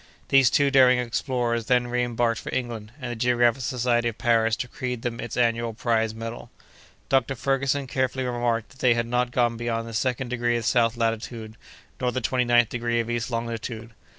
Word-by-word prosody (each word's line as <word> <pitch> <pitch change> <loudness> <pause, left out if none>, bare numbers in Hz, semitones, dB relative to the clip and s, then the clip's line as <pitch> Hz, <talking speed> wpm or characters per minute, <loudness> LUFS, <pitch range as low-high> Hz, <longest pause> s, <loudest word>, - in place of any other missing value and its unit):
These 135 -2 +6
two 140 -1 +2
daring 130 -2 +6
explorers 120 -1 -1
then 125 -1 +3
reembarked 120 -1 0
for - - -6
England; 115 -4 -4
and 125 -3 -5
the - - -4
Geographical 120 +1 +2
Society 120 -1 0
of 110 - -9
Paris 115 -2 +2
decreed 125 0 -5
them 120 -1 -3
its 120 - -5
annual 115 -1 +1
prize 110 -1 0
medal. 115 +1 -7 0.6
Dr. 135 0 +1
Ferguson 135 +2 0
carefully 130 0 -1
remarked 120 -2 -1
that 135 - -20
they 125 -2 +4
had 115 0 0
not 125 +1 0
gone 120 -1 +1
beyond 115 -1 -2
the 115 - -8
second 125 +2 -1
degree 120 -1 0
of 115 - -4
south 115 0 +2
latitude, 115 -1 -3 0.5
nor 125 -1 0
the 130 - -2
twenty 125 +1 0
ninth 120 -1 +3
of 120 -1 -1
east 120 +1 -2
longitude. 115 -1 -4
120 Hz, 180 wpm, -25 LUFS, 115-125 Hz, 0.6 s, These